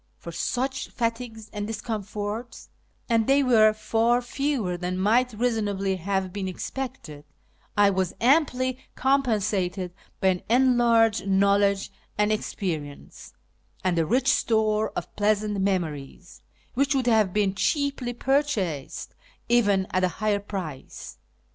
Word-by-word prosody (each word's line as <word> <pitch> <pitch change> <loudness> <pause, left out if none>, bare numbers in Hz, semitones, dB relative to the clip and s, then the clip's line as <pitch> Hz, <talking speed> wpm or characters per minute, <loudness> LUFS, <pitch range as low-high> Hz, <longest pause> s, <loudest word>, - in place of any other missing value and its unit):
For 170 - -9
such 260 +10 -2
fatigues 230 -2 -3
and 205 -1 -3
discomforts 215 +1 -5 0.4
(and 230 -2 +2
they 275 +1 +4
were 220 -4 +5
far 225 +2 +1
fewer 245 -6 -2
than 180 +1 -3
might 235 +6 +2
reasonably 205 -4 -1
have 190 0 -2
been 195 -2 -3
expected) 185 - -6 0.5
I 205 -1 +5
was 190 -2 -1
amply 255 -1 +2 0.2
compen 265 -6 +2
sated 185 -3 -2 0.3
by 190 - +3
an 180 -1 0
enlarged 235 -4 +3
knowledge 200 0 +2 0.3
and 210 +1 +2
experience, 160 -9 -5 0.5
and 185 -2 +1
a 165 - +2
rich 255 - +2
store 220 -3 +2
of 175 - -5
pleasant 210 -1 +1
memories, 175 -4 -3 0.3
which 275 +3 +1
would 260 -2 +1
have 220 -5 +3
been 200 -1 +1
cheaply 275 +2 -1
purchased 240 - -1 0.4
even 205 -5 +3
at 185 - +1
a - - +5
higher 210 -2 +1
price. 185 -9 -7
210 Hz, 125 wpm, -25 LUFS, 190-240 Hz, 0.5 s, were